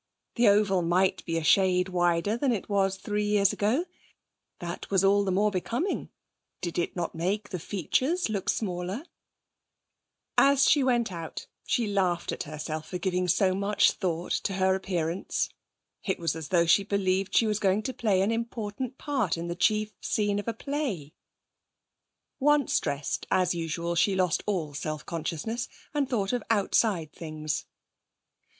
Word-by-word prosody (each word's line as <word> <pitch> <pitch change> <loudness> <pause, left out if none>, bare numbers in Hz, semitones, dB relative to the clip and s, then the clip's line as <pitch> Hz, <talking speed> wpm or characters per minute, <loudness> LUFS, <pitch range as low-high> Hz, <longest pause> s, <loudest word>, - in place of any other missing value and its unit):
The 240 - +3
oval 200 -2 +4
might 180 +3 +2
be 165 - -1
a 165 - -2
shade 180 +2 +4
wider 175 +2 +1
than 260 +2 +1
it 220 -5 -2
was 195 -2 +1
three 210 +2 -2
years 205 -1 +3
ago; 235 - +1 0.7
that 175 0 -6
was 195 -1 +3
all 200 +1 +4
the 195 - -1
more 205 +3 +2
becoming; 235 - -2 0.5
did 175 -1 -3
it 170 - -2
not 175 -2 -2
make 195 +6 -2
the 180 - -4
features 255 - 0
look 200 -4 -2
smaller? 185 - -2 1.3
As 275 0 +5
she 290 - +5
went 240 -4 +2
out 165 -2 -6 0.2
she 235 - +1
laughed 185 -4 0
at - - -4
herself 155 +1 -5
for 180 - -4
giving 180 -1 -1
so 185 +2 +3
much 200 +2 +3
thought 175 -3 -3
to 195 - 0
her 190 0 +2
appearance. 180 -2 -1 0.5
It 190 - -1
was 165 -2 -1
as 160 -2 -6
though 170 +1 +3
she 165 +4 +5
believed 195 -1 0
she 200 - +5
was 210 -1 0
going 200 +2 +2
to 260 - -3
play 210 -6 +1
an 200 +3 +2
important 230 +2 -4
part 260 - -1
in 170 +1 -4
the 170 - -2
chief 215 +3 +1
scene 205 -1 0
of 205 - -6
a 230 - 0
play. 225 - -3 1.3
Once 295 -1 +3
dressed, 140 0 -3
as 185 -1 +2
usual 170 0 -2
she 190 +3 +2
lost 180 -3 +1
all 170 -8 -1
self 155 +1 -4
consciousness, 170 +9 -3 0.3
and 285 -3 0
thought 210 -3 0
of 245 - 0
outside 200 -6 +1
things. 155 -2 -4
195 Hz, 165 wpm, -28 LUFS, 175-215 Hz, 1.3 s, As